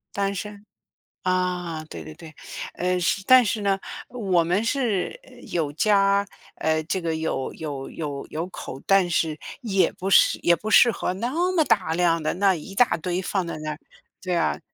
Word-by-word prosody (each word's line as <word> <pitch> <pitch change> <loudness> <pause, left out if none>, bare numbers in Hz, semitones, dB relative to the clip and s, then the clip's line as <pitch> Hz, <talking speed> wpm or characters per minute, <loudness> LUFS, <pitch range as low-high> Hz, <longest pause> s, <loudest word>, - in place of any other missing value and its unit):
单 200 0 0
身， 205 +1 -7 0.6
啊， 180 -3 -1
对 - - -9
对 155 - -9
对。 160 0 -12 0.4
呃， 180 +1 0 0.3
但 255 +2 +8
是 215 0 -1
呢， 195 -1 +1 0.3
我 195 -8 +1
们 180 +6 +1
是， 235 - -1
呃， - - -18 0.2
有 155 -4 -1
家 200 +2 +3 0.3
呃， 160 0 +1
这 185 +4 -2
个 165 -1 -1
有 160 -4 -2
有 145 -4 -6
有 145 -3 -5
有 160 +2 -3
口， 135 -7 -8
但 195 -2 +4
是 160 -2 0 0.2
也 195 -5 +2
不 195 +2 -4
适 - - +6
也 175 - +5
不 215 - -6
适 235 +3 +7
合 195 - -2
那 230 +6 -2 0.2
么 330 -3 +4
大 185 - +2
量 170 -1 +2
的 155 - -1
那 195 +1 +3
一 180 +3 -8
大 245 +3 +4
堆 175 +2 -2
放 190 -1 -2
在 170 - -5
那， 155 0 -4 0.5
对 180 -1 -1
啊。 170 - 0
180 Hz, 190 characters per minute, -24 LUFS, 160-200 Hz, 0.6 s, 但